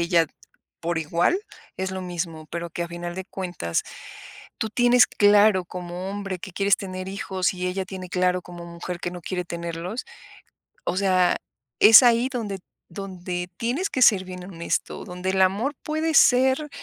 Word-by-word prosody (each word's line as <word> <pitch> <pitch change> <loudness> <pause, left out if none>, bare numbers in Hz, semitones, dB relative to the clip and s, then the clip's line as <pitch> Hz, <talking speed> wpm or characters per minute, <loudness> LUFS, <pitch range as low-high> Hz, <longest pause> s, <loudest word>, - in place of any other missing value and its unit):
ella 170 -1 +3 0.5
por 170 0 -2
igual 170 - +1 0.4
es 190 0 -2
lo 190 0 -4
mismo, 170 -3 -5
pero 170 0 -4
que, 170 - -3
a - - -8
final 175 0 -6
de 190 - -4
cuentas, 175 - -3 0.8
tú 220 - -1
tienes 245 +2 +5
claro, 205 -2 +4
como 180 +1 -6
hombre, 200 -2 -4
que 195 - -7
quieres 200 +2 +3
tener 185 -1 -6
hijos, 190 -1 -1
y 180 0 -3
ella 190 +1 -2
tiene 185 -1 -8
claro, 180 0 +1
como 175 -1 -10
mujer, 170 +1 -6
que 175 - -4
no 180 - -7
quiere 180 +1 -3
tenerlos. 170 +5 -5 0.8
O - - -2
sea, 185 -2 +3 0.4
es 220 0 +10
ahí 240 0 +4
donde 215 -6 -3 0.3
donde 180 -1 -5
tienes 270 +12 -1
que 255 - +2
ser 195 -5 +5
bien 180 -1 -8
honesto, 170 -3 -3
donde 180 +1 -3
el 190 0 +1
amor 205 +10 +2
puede 315 +1 -1
ser 265 +2 +4
185 Hz, 170 wpm, -24 LUFS, 175-205 Hz, 0.8 s, es